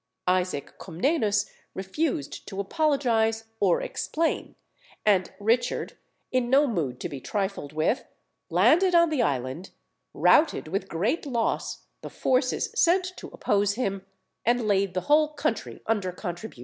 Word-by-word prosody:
Isaac 180 -6 -1
Comnenus 210 - 0 0.3
refused 190 - -3
to 195 - -6
apologise 225 -3 +1 0.2
or 185 -4 +3
explain, 325 +1 -2 0.5
and 195 -4 +3
Richard, 230 +4 0 0.4
in 255 -2 +1
no 275 +3 +5
mood 155 - -2
to - - -2
be 140 -2 -7
trifled 195 - -3
with, 155 - 0 0.5
landed 360 +3 +4
on 340 -1 +5
the 290 -5 +1
island, 135 - -2 0.4
routed 305 - +3
with 195 +3 -3
great 215 - -1
loss 235 -4 -1 0.2
the - - -7
forces 260 - 0
sent 370 -3 +2
to - - -8
oppose 205 0 0
him, 195 -6 -2 0.4
and 240 -1 +1
laid 195 -2 +1
the 185 - 0
whole 305 +3 +3
country - - -3
under 205 -5 0
contribution. 175 - -7
215 Hz, 135 wpm, -26 LUFS, 185-280 Hz, 0.5 s, no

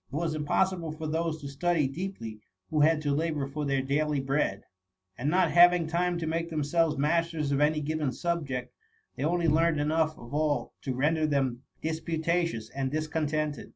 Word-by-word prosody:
It - - -6
was 160 0 -1
impossible 165 +2 0
for 155 0 -6
those 160 +1 -1
to 140 - -6
study 150 +1 +1
deeply 135 - -6 0.3
who 155 - +1
had 155 0 +4
to 145 -1 +1
labour 155 -1 0
for 150 +2 -4
their 135 -1 +1
daily 145 +2 0
bread; 135 -7 0 0.5
and 135 +8 -1
not 185 +4 +3
having 175 -1 +6
time 175 +2 0
to 165 - -3
make 165 +1 -1
themselves 155 0 +1
masters 160 0 +1
of 140 +1 +1
any 150 +1 +3
given 150 -2 -1
subject, 135 -7 -3 0.4
they 130 - -4
only 170 +2 +1
learned 160 0 +3
enough 155 +1 +1
of 120 +2 -11
all 150 -1 0
to 130 -2 -3
render 155 +4 +2
them 135 -4 0 0.2
disputatious 160 -5 -1
and 135 -1 -2
discontented. 155 0 -2
155 Hz, 175 wpm, -28 LUFS, 140-165 Hz, 0.5 s, having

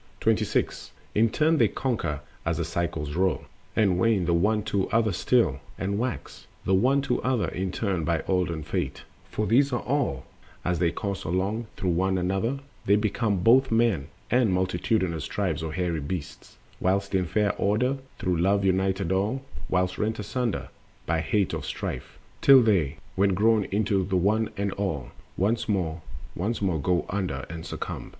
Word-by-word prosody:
The - - +2
Law - - +8
of - - -1
the - - -4
Elements. - - -7
26. - - -1 0.2
In 115 +2 +4
turn 155 +7 +2
they - - +6
conquer 85 - -2 0.2
as 85 -1 0
the 85 - -1
cycles 80 -3 -2
roll, 95 0 +1 0.3
And 95 -5 +3
wane 105 -3 +3
the 85 - +2
one 105 +5 +2
to 100 -2 -1
other 115 -1 +2
still, 90 - +2 0.2
and 100 +2 -1
wax 125 +1 -4 0.2
The 95 - +2
one 130 +8 +3
to - - 0
other 130 -4 +1
in 95 0 -3
turn 95 -5 -1
by 80 0 0
olden 90 -4 0
Fate; - - -3 0.3
For 110 - -1
these 135 +6 +4
are 120 - 0
all, 125 - -1 0.4
and, 90 - +2
as 90 - -1
they 85 -1 +3
course 100 +2 -4
along 100 +7 -1
Through 90 - 0
one 95 +2 +1
another, 95 +8 0 0.3
they 100 - +6
become 105 -2 0
both 130 +5 +6
men 115 -11 +2 0.2
And 120 -3 +4
multitudinous 90 -2 0
tribes 90 -6 -1
of 80 -1 -4
hairy 90 -3 -1
beasts; 75 0 -6 0.2
Whiles 100 +2 +1
in 95 -1 +2
fair 105 +3 +1
order 125 +7 +1 0.2
through 90 -2 0
Love 100 +2 +2
united 95 -1 +1
all, 105 +8 0 0.3
Whiles 90 0 0
rent 110 +1 0
asunder 115 +2 -2 0.4
by 85 - +1
the - - 0
hate 100 -3 +2
of - - -3
Strife, - - -5 0.2
Till 135 -2 +8
they, 95 -11 +2 0.2
when 95 0 +3
grown 110 +1 +3
into 100 -1 +1
the 95 +1 -2
One 105 +5 +2
and 100 0 0
All 90 -11 -3 0.3
Once 110 +5 0
more, 85 -5 -1 0.3
once 105 +6 -2
more 90 -7 0
go 90 +3 +1
under 90 -9 -2
and 85 -1 -6
succumb. - - -5
95 Hz, 185 wpm, -26 LUFS, 90-110 Hz, 0.4 s, Law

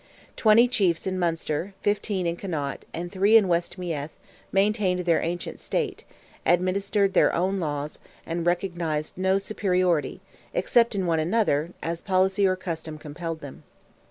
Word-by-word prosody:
Twenty 225 +2 +5
chiefs 190 -9 +1
in 185 -1 -1
Munster, 170 +2 -1
fifteen 205 -2 0
in 170 0 0
Connaught, 155 -7 -4
and 175 +1 -5
three 200 +3 +5
in 210 -4 +3
West 170 +1 0
Meath, 160 -5 -4 0.4
maintained 195 -2 +2
their 170 -2 +2
ancient 175 +1 -4
state, 430 -5 -2 0.4
administered 195 +2 +2
their - - +5
own 190 +3 0
laws, 150 -2 -3 0.3
and 170 0 -3
recognized 170 -3 -1
no 190 +1 +2
superiority, 185 -7 0 0.4
except 235 -2 +3
in 190 -2 0
one 165 -2 +1
another, 170 -3 +1
as 165 0 -3
policy 190 +1 +2
or 185 - +2
custom 165 -4 -5
compelled 160 +2 -6
them. 140 -2 -10
180 Hz, 145 wpm, -25 LUFS, 165-195 Hz, 0.4 s, Twenty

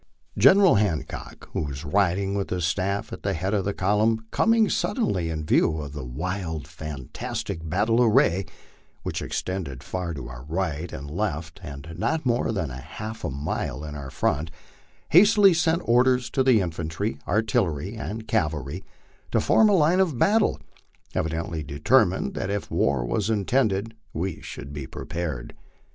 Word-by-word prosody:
General 190 - +6
Han 100 -7 +1
cock, - - -9
who - - 0
was 70 0 -5
riding 95 +3 +1
with 100 -1 -2
his 90 -2 -1
staff 100 +5 -1
at - - -7
the 100 -1 -1
head 95 +5 -2
of 100 -3 +1
the 100 - +1
column, 110 +3 +2
coming 225 -1 +4
suddenly 100 - 0
in 80 -1 -3
view 80 +1 +3
of 70 -2 -6
the 75 -2 -5
wild 80 +3 -4
fantastic 75 0 -5
battle 110 +7 +2
array, 100 -5 +4 0.6
which - - -3
extended 80 -9 -4
far 90 0 -3
to 65 -4 -6
our - - -9
right 80 0 -2
and 70 +2 -7
left 85 -3 -3
and 70 +1 -8
not 160 - 0
more 120 -1 +1
than 90 -10 -2
half 110 - -7
a - - -1
mile 70 0 -3
in 75 -1 -6
our 70 -2 -6
front, 75 +4 0 0.6
hastily 200 +2 +7
sent 165 +1 +1
orders 125 +1 +3
to 135 - +1
the 130 -5 +5
infan 85 -3 -3
try, 70 -3 -3
artillery, 100 -4 0
and 110 0 -5
cavalry 75 +2 -1 0.5
to - - +2
form 220 - +5
line 180 -3 +4
of 170 -9 +2
battle, 210 - +3 0.5
evidently 80 0 -2
determined 90 - +2
that 95 - -3
if 100 0 -3
war 70 -3 +1
was 100 - -1
intended 110 0 +1 0.2
we 85 +2 -3
should 70 0 -8
be 70 -2 -5
prepared. 80 -5 -5
95 Hz, 160 wpm, -25 LUFS, 75-110 Hz, 0.6 s, hastily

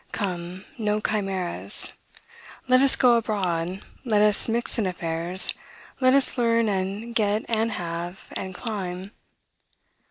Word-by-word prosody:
Come, 180 -1 -4
no 210 -1 0
chimeras! 195 -4 -3 0.7
Let 255 0 +5
us 275 -1 +6
go 245 -2 +5
abroad; 190 -5 -2 0.2
let 215 -5 +2
us 210 +2 +4
mix 235 +1 -1
in 205 - +1
affairs; 175 +1 +2 0.5
let 255 0 +4
us 275 -1 +4
learn, 230 -1 +2
and 200 +4 -3
get, 215 -1 0
and 225 -1 0
have, 175 +1 -6
and 190 -1 -6
climb. 190 -4 -5
205 Hz, 125 wpm, -24 LUFS, 180-230 Hz, 0.7 s, us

